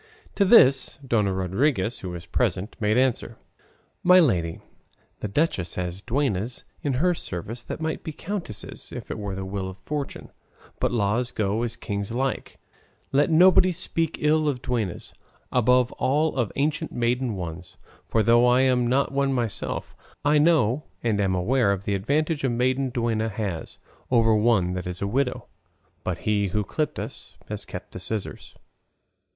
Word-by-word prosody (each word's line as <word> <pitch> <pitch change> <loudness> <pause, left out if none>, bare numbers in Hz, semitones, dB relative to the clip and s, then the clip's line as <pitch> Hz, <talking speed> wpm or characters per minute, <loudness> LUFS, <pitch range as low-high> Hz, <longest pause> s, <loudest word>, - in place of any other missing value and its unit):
To 200 - +2
this 135 - +6
Dona 105 -5 +2
Rodriguez, 95 - 0
who 95 - -6
was 85 -1 -7
present, 100 +2 -1
made 105 +1 +2
answer, 125 -3 0 0.6
"My 180 +1 +7
lady 85 - +1 0.6
the - - -3
duchess 100 - 0
has 90 +1 -4
duennas 120 -2 -1 0.2
in 145 - -1
her 175 +8 +2
service 110 - -6
that - - -6
might 160 0 -2
be 160 - -4
countesses 165 - -5
if - - -7
it - - -4
was 100 -2 -4
the 95 0 -5
will 95 0 -4
of 95 - -10
fortune; 145 +8 -5 0.5
'but - - +1
laws 120 +2 +1
go 105 0 -1
as 120 -1 -1
kings 100 -2 -4
like;' 135 +2 -2 0.5
let 145 +4 +3
nobody 180 +3 +6
speak 165 -2 -2
ill 155 0 +3
of 125 -3 -4
duennas, 110 -8 -3 0.4
above 125 0 +3
all 150 +4 +1
of 120 -6 0
ancient 155 +2 -1
maiden 120 -1 0
ones; 90 -1 -7 0.3
for 110 - +2
though 120 +2 +5
I 125 +1 +5
am 125 -2 +3
not 135 +4 +2
one 140 0 +1
myself, 120 -5 -3 0.3
I 150 +1 +4
know 150 -4 +3 0.2
and 110 -3 +1
am 95 -2 +1
aware 105 +4 +2
of 100 -1 -2
the 100 - -1
advantage 145 - 0
a 135 - +2
maiden 130 +3 +1
duenna 115 -3 -1
has 100 -6 -4 0.3
over 115 -3 +4
one 105 -5 +3
that 90 -1 -4
is 90 0 -4
a - - 0
widow; 125 +4 -1 0.6
but - - -2
'he 105 -1 +2
who 105 +3 -1
clipped 150 +7 -2
us - - -8
has - - -5
kept - - -8
the - - -7
scissors. 110 -3 -5
120 Hz, 165 wpm, -25 LUFS, 100-140 Hz, 0.6 s, My